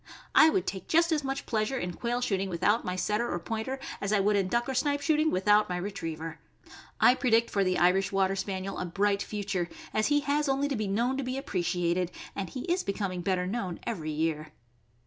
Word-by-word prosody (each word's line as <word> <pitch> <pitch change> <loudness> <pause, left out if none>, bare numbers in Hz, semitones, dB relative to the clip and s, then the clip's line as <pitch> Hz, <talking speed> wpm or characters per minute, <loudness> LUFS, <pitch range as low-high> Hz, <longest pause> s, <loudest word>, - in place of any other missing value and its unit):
I 320 - +8
would 370 +3 0
take 190 - -5
just 335 +1 +3
as 305 -2 +1
much 270 +1 -3
pleasure 225 +4 -1
in 180 -7 -3
quail 240 +5 -2
shooting 195 -5 0
without 190 +6 +1
my 180 - -3
Setter 210 +6 0
or - - -1
Pointer 225 +8 -4 0.2
as 200 - -1
I 210 - +3
would 205 +1 +3
in 195 -2 +2
duck 235 +4 0
or 265 - -2
snipe 285 +2 +1
shooting 310 +1 +2
without 210 -1 +3
my 180 - -1
Retriever. 165 -4 -5 0.6
I 245 - +7
predict 235 -3 +2
for 200 - +2
the 185 -1 +1
Irish 185 +2 +3
Water 195 0 +2
Spaniel 190 0 -3
a 180 - -2
bright 200 +3 +1
future, 195 -5 -2 0.2
as 215 - +2
he 290 0 +3
has 290 0 0
only 275 +1 +1
to 275 - -1
be 215 -2 -2
known 235 +7 0
to 275 - -2
be 255 +1 -3
appreciated, 180 -7 -1 0.3
and 195 -2 -3
he 255 - -6
is 355 +4 0
becoming 195 -3 -2
better 180 0 0
known 190 -3 -3
every 170 -10 -3
year. 155 0 -2
205 Hz, 215 wpm, -29 LUFS, 185-255 Hz, 0.6 s, I